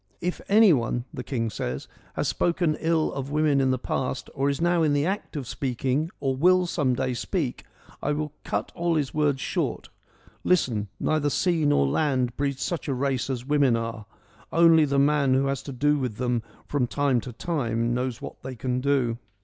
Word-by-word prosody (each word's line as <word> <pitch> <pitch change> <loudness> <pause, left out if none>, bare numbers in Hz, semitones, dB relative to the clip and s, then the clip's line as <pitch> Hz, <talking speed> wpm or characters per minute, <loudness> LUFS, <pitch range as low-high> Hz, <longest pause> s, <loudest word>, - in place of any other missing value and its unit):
' - - -40
If - - -6
any 210 -2 +7
one,' 120 -2 -1
the - - -5
king 115 -5 -2
says, 65 -7 -4
' - - -29
has - - -1
spoken 170 -2 +1
ill 165 -1 +1
of 135 0 -4
women 150 -2 +2
in 130 - +2
the 130 - +2
past, 130 +1 -3
or 140 +1 +1
is 140 - -1
now 175 0 +2
in 155 -2 +3
the 145 +1 +2
act 195 -1 -3
of 140 -3 -3
speaking 130 +4 -1
or 135 -2 0
will 180 +6 +4
some 145 -7 0
day 130 0 -1
speak, 140 +1 -3 0.4
I 150 - 0
will 150 0 -3
cut - - -2
all 170 -1 0
his 145 -4 -1
words 145 -3 +1
short - - -2 0.3
— - - -26
listen 120 - +1
— - - -43
Neither 155 -2 +1
sea 165 +1 +1
nor 105 - +3
land 125 - +1
breeds 140 -1 -2
such 170 -3 -3
a 135 - 0
race 135 0 -1
as 125 -2 -3
women 140 -4 +3
are: 115 -2 -4 0.4
only 165 -2 +6
the 140 -1 0
man 140 -1 +3
who 135 +1 +2
has 135 -1 -1
to 140 - -7
do 145 +3 +2
with 125 -5 -2
them 120 0 0 0.2
from 140 -4 0
time 135 -2 +1
to 125 - -7
time 120 -4 -1
knows 125 -1 -2
what - - -8
they 130 0 -6
can 125 +1 -2
do.' 130 -4 +1
140 Hz, 210 wpm, -26 LUFS, 125-155 Hz, 0.4 s, any